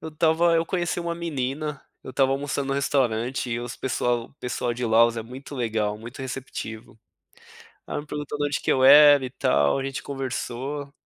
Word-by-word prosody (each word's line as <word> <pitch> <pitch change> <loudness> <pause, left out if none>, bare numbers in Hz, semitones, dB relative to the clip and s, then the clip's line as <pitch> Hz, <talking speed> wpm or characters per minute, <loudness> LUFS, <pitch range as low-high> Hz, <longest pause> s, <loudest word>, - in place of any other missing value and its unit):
eu 160 - -6
estava 165 +2 +2
eu 165 - +2
conheci 175 -1 -1
uma 170 0 -3
menina, 150 -2 -3 0.2
eu - - -7
estava 135 +1 +2
almoçando 140 0 -2
no - - 0
restaurante 125 -3 0
e 115 0 -1
os 120 0 -6
pessoal 120 -2 -1
o - - -25
pessoal 125 -2 -3
de 125 +1 -4
Laos 115 +1 +4
é 115 - -3
muito 130 +5 -10
legal, 110 -3 -1
muito 120 +5 -10
receptivo. 125 -4 -7 0.9
Ai - - -3
me 150 - -13
perguntou 150 0 -5
da 145 - +1
onde 145 - -2
que - - -1
eu 130 - +1
era 145 0 +8
e 130 - -4
tal, 70 - +2
a 135 - -3
gente 135 -1 -4
conversou 135 +1 -4
135 Hz, 195 wpm, -25 LUFS, 120-145 Hz, 0.9 s, era